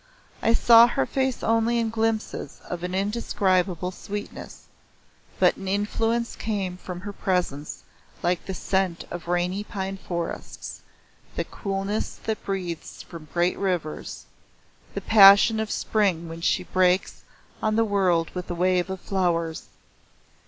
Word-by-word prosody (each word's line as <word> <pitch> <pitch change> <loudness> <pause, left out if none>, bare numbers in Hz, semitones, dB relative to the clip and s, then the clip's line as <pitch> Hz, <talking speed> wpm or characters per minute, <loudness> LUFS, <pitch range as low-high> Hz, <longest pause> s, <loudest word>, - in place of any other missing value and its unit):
I 230 - +3
saw 235 0 +8
her 135 - 0
face 265 - -1
only 230 +1 +2
in 230 -1 0
glimpses 225 -1 -2
of 175 -1 -5
an 180 +1 -3
indescribable 190 -3 0
sweetness, 205 +3 -7 0.7
but - - +4
an 195 - -7
influence 225 +4 0
came 195 -5 -2
from 180 -1 -7
her 205 +1 -6
presence 175 -7 -2 0.4
like 175 0 +1
the 190 - -3
scent 185 -3 -1
of 175 -1 -6
rainy 175 +3 0
pine 195 -1 -4
forests, 170 -3 -5 0.5
the - - 0
coolness 195 +1 -3
that 220 -1 -3
breathes 180 -4 -5
from 165 -3 -11
great 175 +1 +1
rivers, 180 -6 -3 0.7
the - - -2
passion 205 +1 +7
of 220 -1 -2
Spring 190 -9 0
when 165 0 -8
she - - +1
breaks 185 0 +1 0.4
on 215 -1 +1
the 225 0 +3
world 185 -5 +1
with 180 0 -5
a 175 - -2
wave 180 +1 +1
of 190 0 -4
flowers. 170 -4 -1
190 Hz, 140 wpm, -25 LUFS, 175-210 Hz, 0.7 s, saw